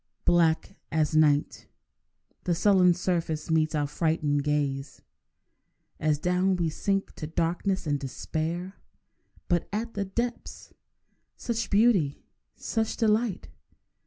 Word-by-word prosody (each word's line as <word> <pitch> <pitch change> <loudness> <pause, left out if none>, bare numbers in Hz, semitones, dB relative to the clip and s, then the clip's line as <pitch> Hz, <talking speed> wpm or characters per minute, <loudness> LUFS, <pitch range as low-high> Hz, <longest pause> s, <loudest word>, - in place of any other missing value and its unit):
Black 165 -2 +2
as 155 -1 +1
night 150 -2 +2 0.8
The 175 - +1
sullen 180 -1 +4
surface 165 -4 -2
meets 155 -1 +2
our 145 -1 +1
frightened 150 -1 0
gaze, 145 -2 -2 1.0
As 155 -1 +1
down 180 +4 +1
we 170 -2 0
sink 195 +4 -1
to 155 - -5
darkness 175 +4 -1
and 145 -2 0
despair. 160 +7 -4 0.7
But 175 -2 0
at 225 +3 -3
the 200 -1 -2
depths—such 235 +1 -6
beauty! 200 -9 +3 0.3
such 220 -1 -2
delight! 220 -3 +1
170 Hz, 105 wpm, -27 LUFS, 155-195 Hz, 1.0 s, sullen